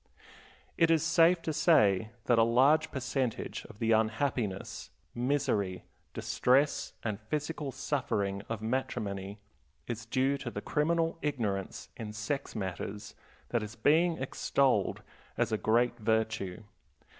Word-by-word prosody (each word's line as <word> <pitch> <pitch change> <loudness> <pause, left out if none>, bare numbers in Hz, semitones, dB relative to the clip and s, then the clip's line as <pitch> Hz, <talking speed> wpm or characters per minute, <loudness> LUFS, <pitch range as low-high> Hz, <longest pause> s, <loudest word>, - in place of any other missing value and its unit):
It 165 - +5
is 165 -1 +4
safe 165 +1 +4
to 160 - -2
say 110 - +4 0.2
that 120 -2 +4
a - - +7
large 140 +7 +4
percentage 130 -2 -3
of - - -13
the 115 +1 0
unhappiness, 110 -2 0 0.2
misery, 120 -8 0 0.3
distress, 135 +4 +2
and 105 -3 -2
physical 145 +5 -3
suffering 100 -9 -1
of 110 -1 -4
matrimony 100 -5 -3 0.5
is 120 -1 -5
due 135 +2 +1
to - - -4
the - - -5
criminal 165 +2 0
ignorance 110 -10 -2
in 105 -2 -6
sex 120 +6 -3
matters 100 +1 -5 0.4
that 120 - 0
is 105 +2 -7
being 165 +5 +3
extolled 130 -4 +1 0.3
as - - +1
a 110 - +1
great 120 +2 +2
virtue. 110 -3 -1
120 Hz, 125 wpm, -31 LUFS, 105-145 Hz, 0.5 s, a